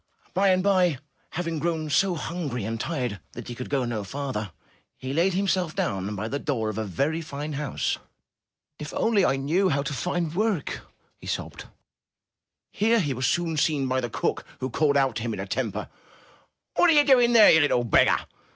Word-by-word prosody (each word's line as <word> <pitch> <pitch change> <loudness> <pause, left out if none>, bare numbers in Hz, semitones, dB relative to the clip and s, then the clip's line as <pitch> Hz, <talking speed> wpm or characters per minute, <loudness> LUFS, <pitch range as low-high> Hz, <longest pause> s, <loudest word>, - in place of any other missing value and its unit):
By 195 +2 +3
and 185 0 +3
by, 185 -6 +3 0.4
having 165 -2 -2
grown 160 -2 -2
so 185 +5 +3
hungry 150 - -4
and 115 +1 -3
tired 125 - -3
that - - -8
he - - -4
could 125 +1 -7
go 135 -3 0
no 115 -3 -3
farther, 125 -4 -4 0.5
he 130 +1 -5
laid 175 +4 +2
himself 185 -4 0
down 100 +1 -2
by 105 +2 -3
the 140 +5 -3
door 115 -8 -1
of 110 0 -4
a 110 - -2
very 140 - -1
fine 150 -1 -6
house. 145 -2 -2 0.8
''If 150 - -6
only 220 -4 +3
I 135 - +3
knew 165 +8 +1
how 140 -3 0
to 145 - -3
find 170 +1 -2
work!" 200 -5 -1 0.4
he - - -11
sobbed. - - -4 1.1
Here 225 +3 +2
he 145 -8 0
was 130 0 -1
soon 170 -2 0
seen 145 -3 +1
by 130 0 0
the 120 - -3
cook, - - -2 0.2
who 130 0 -3
called 145 +1 +2
out 135 -5 +1
to - - -3
him 115 -1 -2
in - - -8
a 95 - -3
temper: 105 -1 -3 0.9
*'What 355 - +5
are - - +6
you 295 -1 +5
doing 245 -4 +5
there, 225 -3 +8
you 160 - +6
little 145 -5 +2
beggar? 115 - +3
145 Hz, 195 wpm, -25 LUFS, 125-175 Hz, 1.1 s, there